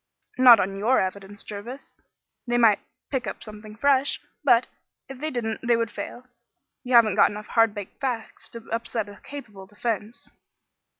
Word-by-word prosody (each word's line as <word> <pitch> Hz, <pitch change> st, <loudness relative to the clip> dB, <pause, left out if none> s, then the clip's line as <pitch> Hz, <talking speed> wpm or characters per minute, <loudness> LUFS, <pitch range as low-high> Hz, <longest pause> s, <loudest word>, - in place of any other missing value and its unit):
"Not 250 Hz, -2 st, +9 dB
on 195 Hz, +1 st, -1 dB
your 235 Hz, +6 st, +3 dB
evidence, 195 Hz, +2 st, -4 dB
Jervis. 230 Hz, +6 st, -8 dB, 0.5 s
They 240 Hz, 0 st, +1 dB
might 225 Hz, -4 st, +5 dB, 0.3 s
pick 260 Hz, -5 st, -2 dB
up 190 Hz, -, -6 dB
something 215 Hz, 0 st, -10 dB
fresh, 280 Hz, +3 st, +2 dB, 0.2 s
but, 245 Hz, -4 st, +5 dB, 0.4 s
if 270 Hz, -1 st, -9 dB
they 310 Hz, +2 st, -2 dB
didn't 230 Hz, -5 st, -3 dB
they 240 Hz, -1 st, +2 dB
would 230 Hz, -1 st, -1 dB
fail. 240 Hz, +4 st, -7 dB, 0.6 s
You 250 Hz, 0 st, +1 dB
haven't 225 Hz, -4 st, +6 dB
got -, -, +5 dB
enough 210 Hz, 0 st, -8 dB
hard 225 Hz, -2 st, +3 dB
baked 205 Hz, -2 st, -8 dB
facts 245 Hz, -5 st, -4 dB
to 230 Hz, -1 st, -10 dB
upset 230 Hz, -1 st, -2 dB
a 205 Hz, -, -13 dB
capable 210 Hz, -9 st, -10 dB
defence. 215 Hz, +1 st, -4 dB
230 Hz, 165 wpm, -25 LUFS, 210-245 Hz, 0.6 s, Not